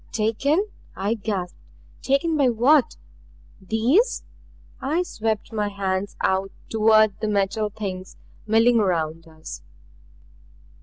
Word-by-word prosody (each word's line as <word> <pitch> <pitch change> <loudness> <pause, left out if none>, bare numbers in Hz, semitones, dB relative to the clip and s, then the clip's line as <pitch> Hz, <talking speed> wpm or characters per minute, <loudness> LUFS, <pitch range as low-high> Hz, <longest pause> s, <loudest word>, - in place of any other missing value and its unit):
"Taken!" 275 - +1 0.3
I 200 +3 -1
gasped. 200 -5 -4 0.4
"Taken 280 +4 +1
by 280 -4 +3
what 250 +5 +3 0.6
these?" 245 - +2 0.6
I 310 +7 0
swept 220 - -3
my 210 -1 -1
hands 195 0 -2
out 190 +1 +1 0.2
toward 215 -2 +4
the 215 - -2
Metal 205 +1 0
Things 190 -3 -6 0.3
milling 225 +2 +4
around 165 -4 -1
us. 160 -1 -9
215 Hz, 105 wpm, -23 LUFS, 195-240 Hz, 0.6 s, toward